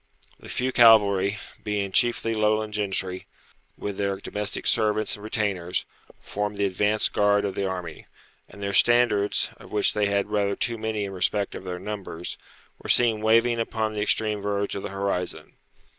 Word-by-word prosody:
The -, -, -12 dB
few 130 Hz, +1 st, -1 dB
cavalry, 105 Hz, -4 st, +5 dB, 0.3 s
being 100 Hz, -2 st, -2 dB
chiefly 115 Hz, +2 st, +2 dB
Lowland 110 Hz, 0 st, +1 dB
gentry, 95 Hz, -3 st, -2 dB, 0.5 s
with 100 Hz, -1 st, -5 dB
their 100 Hz, -1 st, 0 dB
domestic 105 Hz, +1 st, -4 dB
servants 110 Hz, -1 st, +2 dB
and 105 Hz, -, -13 dB
retainers, 100 Hz, -5 st, -1 dB, 0.3 s
formed 105 Hz, 0 st, -4 dB
the 100 Hz, -, +1 dB
advanced 105 Hz, +3 st, +1 dB
guard 105 Hz, 0 st, +3 dB
of 100 Hz, -, -2 dB
the 100 Hz, 0 st, -2 dB
army; 90 Hz, -3 st, -6 dB, 0.4 s
and 100 Hz, -, -11 dB
their 100 Hz, 0 st, -2 dB
standards, 120 Hz, -4 st, +3 dB
of -, -, -15 dB
which 105 Hz, -1 st, +2 dB
they 105 Hz, -1 st, +1 dB
had 100 Hz, +1 st, -1 dB
rather 100 Hz, -1 st, +1 dB
too 115 Hz, -2 st, -2 dB
many 110 Hz, -2 st, -2 dB
in 100 Hz, -, -6 dB
respect 95 Hz, +2 st, 0 dB
of -, -, -8 dB
their 90 Hz, -1 st, -4 dB
numbers, 95 Hz, -4 st, -6 dB, 0.4 s
were -, -, -8 dB
seen 115 Hz, -3 st, +3 dB
waving 115 Hz, +2 st, +3 dB
upon 110 Hz, -1 st, -2 dB
the 105 Hz, -, -2 dB
extreme 105 Hz, 0 st, 0 dB
verge 100 Hz, 0 st, -1 dB
of 100 Hz, -, -4 dB
the -, -, -5 dB
horizon. 100 Hz, -2 st, -3 dB
105 Hz, 170 wpm, -25 LUFS, 100-110 Hz, 0.5 s, cavalry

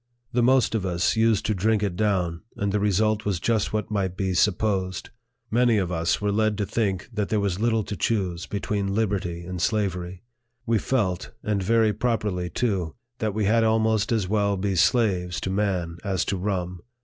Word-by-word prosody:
The 120 Hz, -, +2 dB
most 130 Hz, 0 st, +3 dB
of 110 Hz, -4 st, 0 dB
us 90 Hz, 0 st, +1 dB
used 110 Hz, -2 st, +2 dB
to 110 Hz, -, +1 dB
drink 105 Hz, +2 st, +1 dB
it 100 Hz, -4 st, -1 dB
down, 90 Hz, -5 st, 0 dB
and 100 Hz, 0 st, -1 dB
the 105 Hz, -, +1 dB
result 105 Hz, +1 st, +1 dB
was 100 Hz, -4 st, -1 dB
just 110 Hz, +3 st, 0 dB
what 110 Hz, 0 st, -2 dB
might 95 Hz, -3 st, -1 dB
be 95 Hz, -2 st, -1 dB
supposed: 95 Hz, -1 st, 0 dB, 0.4 s
many 120 Hz, 0 st, +3 dB
of 95 Hz, -3 st, -1 dB
us 85 Hz, 0 st, 0 dB
were 105 Hz, -1 st, 0 dB
led 110 Hz, 0 st, +1 dB
to 105 Hz, -, 0 dB
think 95 Hz, -3 st, -1 dB
that 105 Hz, -2 st, -2 dB
there 110 Hz, -, +1 dB
was 100 Hz, -2 st, -1 dB
little 115 Hz, -1 st, +1 dB
to 105 Hz, -, -5 dB
choose 95 Hz, -6 st, -1 dB
between 100 Hz, -1 st, -2 dB
liberty 100 Hz, -5 st, -1 dB
and 90 Hz, -1 st, -5 dB
slavery. 95 Hz, -3 st, -1 dB, 0.4 s
We 115 Hz, -2 st, +2 dB
felt, 100 Hz, -9 st, -1 dB
and 105 Hz, -2 st, 0 dB
very 110 Hz, +2 st, +3 dB
properly 105 Hz, -6 st, -1 dB
too, 95 Hz, -4 st, -1 dB, 0.2 s
that 110 Hz, -2 st, -1 dB
we 110 Hz, -1 st, +1 dB
had 115 Hz, +3 st, +3 dB
almost 110 Hz, -1 st, +2 dB
as 110 Hz, -5 st, +1 dB
well 100 Hz, 0 st, +1 dB
be 100 Hz, +1 st, -1 dB
slaves 90 Hz, -3 st, +2 dB
to 95 Hz, -, -2 dB
man 95 Hz, -4 st, -1 dB
as 95 Hz, -3 st, 0 dB
to 100 Hz, -, -1 dB
rum. 90 Hz, -2 st, -3 dB
100 Hz, 190 wpm, -25 LUFS, 90-110 Hz, 0.4 s, most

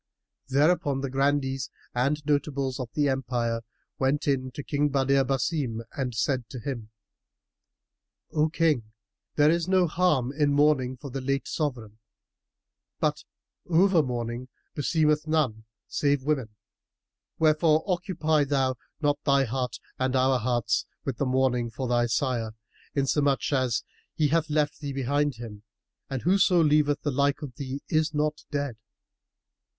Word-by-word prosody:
Thereupon 140 Hz, 0 st, +2 dB
the 135 Hz, -2 st, -3 dB
Grandees 135 Hz, -1 st, 0 dB, 0.2 s
and 140 Hz, +5 st, 0 dB
notables 140 Hz, -3 st, 0 dB
of 125 Hz, -2 st, -4 dB
the 145 Hz, -1 st, +2 dB
Empire 120 Hz, -3 st, -1 dB, 0.4 s
went 140 Hz, +3 st, +1 dB
in 130 Hz, -2 st, +1 dB
to 145 Hz, -, -6 dB
King 145 Hz, +1 st, 0 dB
Badr 135 Hz, 0 st, +3 dB
Basim 135 Hz, -3 st, -1 dB
and 130 Hz, -4 st, -2 dB
said 125 Hz, +1 st, 0 dB
to 130 Hz, -, -7 dB
him, 115 Hz, -3 st, -5 dB, 1.4 s
"O 155 Hz, +1 st, +2 dB
King, 150 Hz, -10 st, +1 dB, 0.4 s
there 150 Hz, +1 st, +5 dB
is 170 Hz, 0 st, 0 dB
no 185 Hz, -1 st, +4 dB
harm 155 Hz, -7 st, +1 dB
in 145 Hz, -1 st, +2 dB
mourning 140 Hz, -3 st, +3 dB
for 140 Hz, +2 st, -8 dB
the 135 Hz, +1 st, -4 dB
late 135 Hz, +1 st, -1 dB
sovran: 120 Hz, -8 st, -3 dB, 1.0 s
but -, -, 0 dB, 0.4 s
over 175 Hz, 0 st, +4 dB
mourning 120 Hz, -2 st, -3 dB, 0.3 s
beseemeth 150 Hz, 0 st, +1 dB
none 130 Hz, -9 st, 0 dB, 0.2 s
save 145 Hz, -2 st, +1 dB
women; 135 Hz, -6 st, 0 dB, 0.9 s
wherefore 155 Hz, 0 st, +3 dB
occupy 175 Hz, -5 st, +1 dB
thou 135 Hz, -2 st, 0 dB, 0.2 s
not 145 Hz, -1 st, +1 dB
thy 140 Hz, -1 st, +4 dB
heart 125 Hz, 0 st, -2 dB, 0.2 s
and 130 Hz, 0 st, 0 dB
our 130 Hz, 0 st, +3 dB
hearts 120 Hz, 0 st, 0 dB, 0.2 s
with 130 Hz, -5 st, -3 dB
mourning 130 Hz, -3 st, +1 dB
for 125 Hz, +3 st, -4 dB
thy 120 Hz, 0 st, +2 dB
sire; 120 Hz, -3 st, -1 dB, 0.4 s
inasmuch 140 Hz, 0 st, +1 dB
as 130 Hz, -4 st, +1 dB, 0.3 s
he 150 Hz, -2 st, +2 dB
hath 160 Hz, +1 st, +1 dB
left 150 Hz, -1 st, 0 dB
thee 140 Hz, -2 st, -4 dB
behind 140 Hz, +1 st, 0 dB
him, 110 Hz, -3 st, -9 dB, 0.5 s
and 135 Hz, -2 st, -3 dB
whoso 185 Hz, 0 st, +4 dB
leaveth 150 Hz, -2 st, +3 dB
the 145 Hz, -, 0 dB
like 140 Hz, +2 st, +1 dB
of 135 Hz, -4 st, -6 dB
thee 135 Hz, 0 st, -5 dB
is 155 Hz, 0 st, +1 dB
not 150 Hz, +1 st, 0 dB
dead." 140 Hz, -5 st, -2 dB
140 Hz, 140 wpm, -27 LUFS, 130-150 Hz, 1.4 s, there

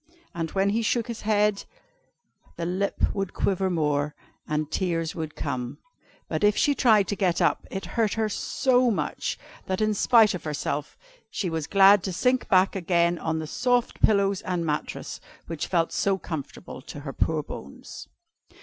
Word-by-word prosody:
And 165 Hz, -1 st, -3 dB
when 195 Hz, +1 st, +3 dB
he 225 Hz, +2 st, +1 dB
shook 230 Hz, +1 st, 0 dB
his 235 Hz, -2 st, -6 dB
head, 210 Hz, -1 st, +1 dB, 0.9 s
the 170 Hz, -, -4 dB
lip 185 Hz, +3 st, 0 dB
would 195 Hz, -2 st, -3 dB
quiver 190 Hz, -1 st, 0 dB
more, 150 Hz, -3 st, 0 dB, 0.3 s
and 155 Hz, 0 st, -2 dB
tears 165 Hz, -3 st, -1 dB
would 160 Hz, -2 st, -5 dB
come. 125 Hz, -4 st, -4 dB, 0.5 s
But -, -, -2 dB
if 210 Hz, 0 st, +4 dB
she 290 Hz, -, +3 dB
tried 220 Hz, -7 st, +4 dB
to 205 Hz, -, 0 dB
get 185 Hz, -4 st, +1 dB
up, -, -, +1 dB
it 195 Hz, -, -5 dB
hurt 225 Hz, -3 st, +1 dB
her 220 Hz, -1 st, 0 dB
so 250 Hz, +4 st, +1 dB
much, 215 Hz, -, -2 dB, 0.3 s
that 185 Hz, 0 st, -1 dB
in 215 Hz, 0 st, +2 dB
spite 220 Hz, 0 st, +5 dB
of 180 Hz, -, -5 dB
herself 150 Hz, -1 st, -3 dB, 0.3 s
she 180 Hz, -4 st, -3 dB
was 160 Hz, -2 st, -3 dB
glad 195 Hz, 0 st, +6 dB
to 190 Hz, -, -3 dB
sink 250 Hz, +7 st, +1 dB
back 190 Hz, +1 st, +3 dB
again 170 Hz, -2 st, +1 dB
on 160 Hz, +1 st, -2 dB
the 160 Hz, -, -3 dB
soft 245 Hz, +8 st, 0 dB
pillows 200 Hz, -2 st, +3 dB
and 180 Hz, -2 st, -2 dB
mattress, 150 Hz, -1 st, -4 dB, 0.2 s
which 165 Hz, -2 st, -4 dB
felt 165 Hz, -2 st, +1 dB
so 195 Hz, -1 st, +1 dB
comfortable 160 Hz, -7 st, -7 dB
to 145 Hz, +2 st, -9 dB
her 140 Hz, -2 st, -6 dB
poor 155 Hz, +2 st, 0 dB
bones. 70 Hz, -, -9 dB
185 Hz, 170 wpm, -26 LUFS, 160-210 Hz, 0.9 s, glad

